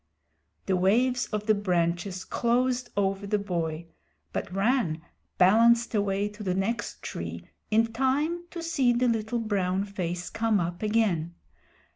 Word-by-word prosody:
The 190 - +1
waves 245 +7 +2
of 210 -1 -3
the 215 - +4
branches 180 -1 -1
closed 245 +1 0
over 195 0 0
the 210 +1 +1
boy, 170 -5 -3 0.5
but - - -3
Rann 195 -5 +1 0.3
balanced 230 +5 +5
away 200 -1 +1
to 210 +1 -12
the 185 -3 -1
next 210 +3 -2
tree 85 0 -6 0.2
in 225 +1 +2
time 290 +8 0
to 340 -1 -6
see 275 -7 +2
the 245 +1 +2
little 225 0 0
brown 200 -4 0
face 180 -3 -4
come 225 -2 +1
up 175 0 -3
again. 205 -7 +1
205 Hz, 140 wpm, -27 LUFS, 185-235 Hz, 0.5 s, balanced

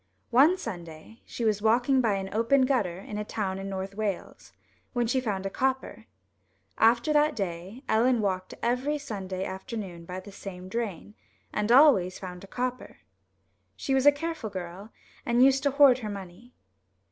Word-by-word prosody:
One 290 +10 +6
Sunday 175 - -8
she 235 - -4
was 210 -2 +1
walking 245 +4 +3
by 220 -4 +2
an 195 0 -5
open 230 +5 +3
gutter 210 -10 0
in 210 +1 -6
a - - -2
town 200 -3 -3
in 195 0 -5
North 190 0 -4
Wales 205 -3 -4 0.4
when 240 -1 +1
she 255 +3 +1
found 200 -5 -3
a - - -1
copper. 260 - -2 0.7
After 235 +6 +4
that 300 0 +3
day 190 +4 -5
Ellen 240 +2 +3
walked 185 -3 -2
every 255 +5 0
Sunday 195 -9 -5
afternoon 190 -3 -6
by 180 +2 -6
the 200 +2 -11
same 185 -2 -9
drain, 210 -2 -4 0.4
and 210 +2 0
always 245 -10 +6
found 180 -1 -8
a - - -11
copper. 250 +3 -4 0.8
She 270 - -2
was 265 +1 +3
a - - +10
careful 315 -5 -4
girl, 190 +2 -7 0.3
and 240 +2 +4
used 270 0 +4
to 285 - +2
hoard 275 -2 +6
her 215 -4 -5
money. 200 +4 -9
220 Hz, 170 wpm, -27 LUFS, 190-255 Hz, 0.8 s, a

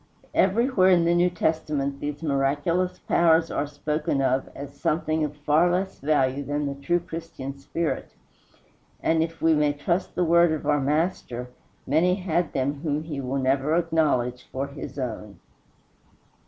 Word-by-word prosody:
Everywhere 200 0 +3
in 175 -2 +4
the 170 - +3
New 175 +1 +3
Testament 150 -5 -1
these 145 +2 -5
miraculous 145 +5 0
powers 165 -1 +3
are 145 - -1
spoken 150 0 -2
of 130 0 +1
as 140 0 -8
something 155 +2 0
of 150 -1 -3
far 150 +4 +3
less 190 +2 -2
value 140 -2 +1
than 145 +1 -2
the 140 - -2
true 140 +6 0
Christian 160 -5 -7
spirit, 165 +3 -3 0.9
and, 160 0 +2
if 165 0 -4
we 165 0 +5
may 150 -1 +2
trust 170 +6 -2
the 180 - +1
word 170 0 +5
of 155 - -4
our 145 -1 +2
Master, 140 -5 -1 0.3
many 165 +6 +3
had 175 -3 -1
them 140 +2 -1
whom 150 -1 -1
he 150 -4 -5
will 130 +1 -2
never 135 +3 +1
acknowledge 155 -8 0
for 135 +1 -2
his 140 0 -8
own. 105 -7 -5
150 Hz, 155 wpm, -25 LUFS, 140-170 Hz, 0.9 s, we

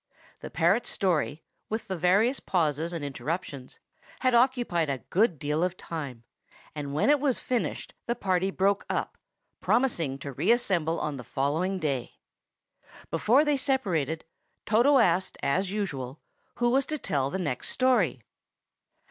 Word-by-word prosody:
The - - -8
parrot's 175 +9 +2
story, 165 -5 0 0.3
with 220 +1 -3
the 190 - -2
various 200 - +3
pauses 165 -2 0
and 165 -4 -4
interruptions, 140 -2 -5 0.4
had 255 -1 +3
occupied 240 - +2
a 130 -4 -3
good 190 -3 +3
deal 150 +4 -1
of 180 0 -1
time; 140 -8 -6 0.5
and 145 -2 -5
when 155 - +4
it 295 - +4
was 270 -3 +1
finished 245 -2 -2
the 235 - 0
party 190 -4 0
broke 195 +1 +1
up, - - -2 0.4
promising 195 - +1
to 140 +1 -7
reassemble 175 - +1
on 150 -2 -3
the 125 - -7
following 155 +10 -1
day. 140 -8 -2 1.0
Before 235 - +4
they 295 -1 +2
separated, 180 - 0 0.4
Toto 240 +7 +4
asked, 185 -6 +2
as 180 +8 +1
usual, 145 -10 -4 0.4
who 240 0 +2
was 270 +1 +2
to 305 - -2
tell 140 - -1
the 165 - -3
next 150 -9 -2
story. 220 - +2
180 Hz, 145 wpm, -28 LUFS, 150-235 Hz, 1.0 s, when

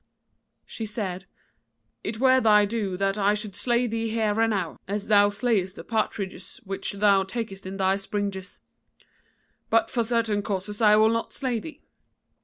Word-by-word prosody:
"She 225 - -6
said: 195 -4 -4 0.8
'It 220 +1 -4
were 260 0 +5
thy 210 -2 +5
due 205 -3 -2
that 195 +1 0
I 205 +1 +3
should 210 -2 -6
slay 240 0 +1
thee 225 -1 -2
here 220 -1 0
and 225 - +3
now, 190 -6 -2
as 205 +2 -4
thou 205 -1 +6
slayest 205 -3 0
the - - -9
partridges 215 0 -3
which 195 0 -4
thou 200 -1 +4
takest 195 -2 -6
in 195 +1 -6
thy 190 0 +2
springes: 200 -1 -4 1.1
but 225 0 +2
for 235 - +1
certain 225 -3 0
causes 200 +1 -4
I 210 -1 +6
will 215 +1 +5
not 230 0 -2
slay 255 -4 -1
thee. 310 +4 -10
210 Hz, 165 wpm, -25 LUFS, 195-225 Hz, 1.1 s, thou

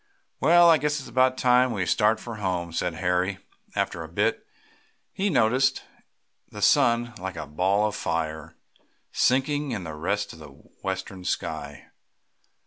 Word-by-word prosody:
"Well, 175 +1 +6
I 165 -2 +6
guess 150 +1 0
it's 135 - -9
about 130 +2 +2
time 125 0 +4
we 100 -5 -1
started 105 +4 +2
for 115 -2 -7
home," 90 -4 -3
said 85 0 -2
Harry, 90 +2 0 0.4
after - - -1
a - - -6
bit, - - +1
as - - -31 0.7
he 200 +2 0
noticed 130 - +2 0.7
the - - -9
sun, 120 0 +3
like 95 -1 -5
a 80 - -5
ball 95 +8 +1
of 105 - -2
fire, 80 -2 -3 0.6
sinking 145 +3 +1
to 80 -2 -6
rest 100 +7 -2
in 80 - -14
the 75 - -10
western 95 +6 -7
sky. 75 -4 -4
105 Hz, 150 wpm, -25 LUFS, 85-130 Hz, 0.7 s, Well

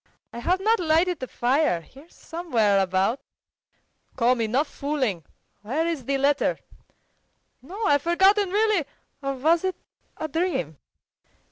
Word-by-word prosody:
"I 235 - -6
have 360 +10 +1
not 440 +3 +2
lighted 340 +1 +2
the 255 - -5
fire. 250 - +1
Here 275 - -17
somewhere 235 - 0
about." 190 +7 0 0.9
"Come, 245 -1 +2
enough 250 +7 +1
fooling! 265 - -2 0.4
Where 270 +10 -1
is 325 -7 -3
the 275 +1 0
letter?" 280 +2 +1 1.0
"No, 375 - -7
I've 285 -8 +3
forgotten 385 +5 +3
really. 415 -4 +2 0.4
Or 275 -1 -2
was 320 +6 +2
it 375 -1 -1 0.4
a 315 - -3
dream? 305 - -2
290 Hz, 130 wpm, -25 LUFS, 245-345 Hz, 1.0 s, I've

